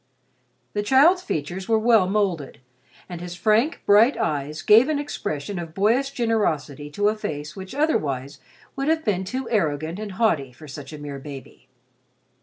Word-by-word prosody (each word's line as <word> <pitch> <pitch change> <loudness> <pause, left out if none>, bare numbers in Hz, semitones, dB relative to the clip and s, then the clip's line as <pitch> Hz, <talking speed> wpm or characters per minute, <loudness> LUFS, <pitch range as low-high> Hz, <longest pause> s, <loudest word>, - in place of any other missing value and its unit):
The 205 - 0
child's 280 - +5
features 180 - -4
were 225 - +4
well 220 -4 +4
molded, 190 - -1 0.5
and 175 -2 -7
his 175 0 -6
frank, 220 - +1
bright 215 +6 +5
eyes 150 +1 -2
gave 230 +7 +6
an 305 - +1
expression 195 - -4
of 165 -1 -8
boyish 230 +8 +2
generosity 170 - -1
to 205 +7 +1
a 215 - -1
face 150 -5 -5
which 190 +4 -8
otherwise 140 - -1 0.4
would 275 +1 -2
have 320 0 +1
been 190 -4 0
too 255 +6 -4
arrogant 160 -4 0
and 210 -2 -6
haughty 165 - +1
for 155 +5 -13
such 140 0 -9
a 155 - -8
mere 145 -2 -7
baby. 135 -2 -11
190 Hz, 165 wpm, -23 LUFS, 150-230 Hz, 0.5 s, gave